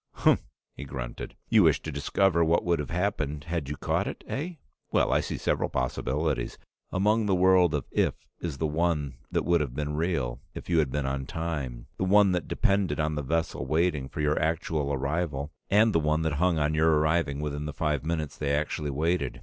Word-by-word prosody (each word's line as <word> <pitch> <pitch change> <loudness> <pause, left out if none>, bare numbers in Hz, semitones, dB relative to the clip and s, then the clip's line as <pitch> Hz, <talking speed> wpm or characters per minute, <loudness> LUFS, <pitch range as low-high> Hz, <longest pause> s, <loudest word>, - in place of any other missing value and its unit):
"Humph!" - - +3 0.3
he - - -8
grunted. - - -6
"You - - +5
wish - - +4
to 80 - -4
discover 85 +5 +2
what 85 +1 +2
would 85 -2 +2
have 75 - -4
happened 80 -5 -1
had 80 -3 -3
you 75 - -4
caught - - 0
it, - - -6
eh? 165 +7 -3 0.4
Well, - - +3
I - - +4
see - - -3
several - - 0
possibilities. 65 +2 -1 0.3
Among 105 +3 +2
the 95 - +3
world 90 -3 +4
of 70 - -2
'if' - - 0
is 80 -5 -4
the 80 - -1
one 75 -4 0
that - - 0
would 85 -2 +3
have 65 -4 -3
been 75 0 -2
real 75 -7 -1
if - - -8
you 85 - +4
had 75 -4 +2
been 70 +1 -2
on 65 0 -2
time, 70 -8 -4
the - - +1
one 100 +1 +5
that 90 -4 -1
depended 100 -6 +1
on 75 0 +1
the 75 - -2
vessel 80 -2 -1
waiting 75 -3 +1
for 75 - -4
your 75 +1 +1
actual 80 -2 0
arrival, 70 +1 -2 0.2
and 105 +2 +4
the 85 - +4
one 75 +1 +1
that 80 -2 0
hung 90 -2 +3
on 75 0 +1
your 80 0 +4
arriving 75 -2 +1
within 75 0 -3
the - - -3
five 75 -1 -1
minutes 80 -2 -2
they 70 -2 0
actually 75 0 -2
waited. 75 0 -1
75 Hz, 205 wpm, -28 LUFS, 70-85 Hz, 0.4 s, You